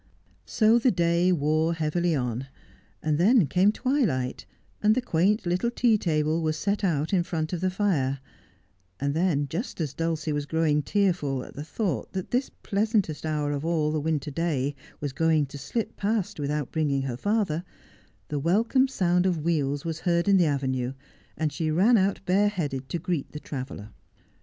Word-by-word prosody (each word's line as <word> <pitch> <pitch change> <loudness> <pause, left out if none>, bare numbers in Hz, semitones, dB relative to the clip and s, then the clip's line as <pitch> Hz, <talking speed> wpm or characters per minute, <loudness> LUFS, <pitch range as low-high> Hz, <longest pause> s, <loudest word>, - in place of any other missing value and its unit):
So 225 +2 +4
the 255 - +3
day 170 -1 +2
wore 160 +1 +1
heavily 165 +1 0
on, 125 -1 -2 0.6
and 155 -1 +1
then 210 +2 +5
came 185 +8 +3
twilight, 220 - -1 0.3
and 215 +1 +4
the - - +2
quaint 200 +1 +1
little 180 +7 +1
tea 240 -1 +3
table 160 -4 0
was 155 -1 0
set 205 +1 -1
out 160 -2 0
in 185 - +4
front 165 -2 -3
of 175 - -2
the 185 - +2
fire; 165 -9 0 0.8
and 140 +2 0
then, 160 -3 +1
just 175 - -5
as 150 -5 -2
Dulcie 160 -1 -2
was 145 0 -2
growing 155 -2 +2
tearful 150 -7 0
at - - -11
the 145 - -6
thought 190 +4 -3
that 185 -2 -4
this 250 +2 +1
pleasantest 200 - 0
hour 150 -2 -1
of 145 0 -3
all 160 -2 +1
the 155 - 0
winter 150 -2 -1
day 145 -3 -1 0.3
was 145 -2 -4
going 160 -1 +2
to 140 +1 -9
slip 220 - -3
past 205 -5 -1
without 145 -1 -2
bringing 145 -4 0
her 130 -3 -3
father, 195 - 0 0.7
the 145 - -1
welcome 225 - +3
sound 180 -7 +1
of 170 -5 -1
wheels 145 -3 0
was 165 -1 -3
heard 170 0 +1
in 200 -1 +5
the 175 -3 +4
avenue, 130 -3 -1 0.4
and 155 -2 -1
she 160 +1 -1
ran 190 +10 +4
out 195 -1 +2
bareheaded 180 -9 0
to - - -1
greet 165 -3 -3
the 150 - -5
traveller. 130 -8 -7
165 Hz, 175 wpm, -26 LUFS, 145-190 Hz, 0.8 s, then